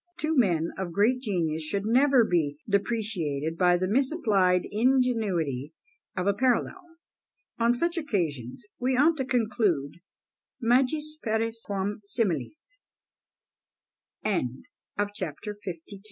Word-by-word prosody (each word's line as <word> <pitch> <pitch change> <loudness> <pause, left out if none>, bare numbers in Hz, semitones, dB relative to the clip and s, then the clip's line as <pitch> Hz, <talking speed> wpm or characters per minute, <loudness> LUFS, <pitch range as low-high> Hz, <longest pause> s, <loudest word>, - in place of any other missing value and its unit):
Two 315 +1 0
men 170 - +2
of 180 -3 -4
great 230 +7 +2
genius 170 -9 -1
should 195 +6 -2
never 255 +2 +5
be 155 -7 0
depreciated 195 -8 -1
by 180 0 +4
the 185 +1 -1
misapplied 210 - +2
ingenuity 210 - +1 0.4
of 180 - -1
a 200 - +3
parallel; 255 - +1 0.8
on 235 +1 +3
such 340 +6 +1
occasions 170 - -3
we 255 +1 +1
ought 310 +5 +5
to 265 - -1
conclude 205 - 0 0.6
_magis 300 +6 +1
pares 225 0 -1
quam 200 0 -2
simil 200 - -1
210 Hz, 100 wpm, -27 LUFS, 175-250 Hz, 0.8 s, never